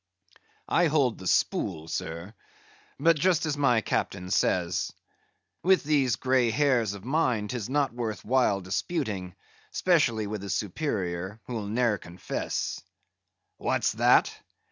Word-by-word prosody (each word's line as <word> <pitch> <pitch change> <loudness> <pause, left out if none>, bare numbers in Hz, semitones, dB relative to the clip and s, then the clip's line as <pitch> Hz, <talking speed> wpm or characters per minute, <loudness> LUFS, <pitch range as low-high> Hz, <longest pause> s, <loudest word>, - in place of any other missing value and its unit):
"I 175 0 +3
hold 140 -6 +1
the 95 - -6
spool, 80 -2 0
sir. 85 +5 -5 0.7
But 165 +1 +4
just 175 0 +2
as 150 -2 -1
my 130 -6 +3
captain 90 -3 -2
says. 90 -2 +1 0.7
With 190 +1 +4
these 140 -5 +2
grey 130 -2 +2
hairs 115 -4 +2
of 100 +1 -11
mine 125 -7 +1
'tis 120 -3 -4
not 140 -2 +1
worth 110 -5 -4
while 120 -5 +2
disputing, 95 - -3 0.3
'specially 135 - +2
with 105 -1 -5
a 100 - -6
superior, 95 - -2
who'll 115 -5 -4
ne'er 115 -1 +1
confess." 85 +2 -4 0.8
"What's - - 0
that? - - +4
115 Hz, 125 wpm, -27 LUFS, 100-140 Hz, 0.8 s, But